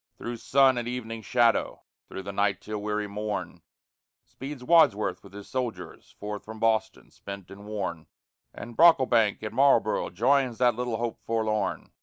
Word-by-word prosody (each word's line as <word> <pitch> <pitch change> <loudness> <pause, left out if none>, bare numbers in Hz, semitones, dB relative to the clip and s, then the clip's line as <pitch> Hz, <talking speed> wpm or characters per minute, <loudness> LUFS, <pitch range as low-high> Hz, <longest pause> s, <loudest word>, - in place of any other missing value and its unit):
Through 120 0 -5
sun 130 +2 +3
and 120 - -5
evening 115 -2 -5
shadow, 120 0 +1 0.2
through 95 - -7
the 100 - -5
night 100 -1 +1
till 105 0 -6
weary 105 0 -2
morn, 105 +1 -5 0.6
Speeds 135 -1 -8
Wadsworth 125 - +3
with 100 - -14
his 100 0 -10
soldiers, 125 -3 -5
forth 105 0 -5
from 110 0 -10
Boston, 110 0 0
spent 100 -1 -10
and 100 +1 -11
worn, 95 -6 -4 0.4
And 120 0 -10
Brocklebank 130 -11 +4
at 110 0 -5
Marlboro' 120 -5 +3
joins 130 -1 +1
that 125 0 +3
little 120 0 -3
hope 120 0 -3
forlorn. 110 -3 -1
110 Hz, 155 wpm, -27 LUFS, 105-125 Hz, 0.6 s, Brocklebank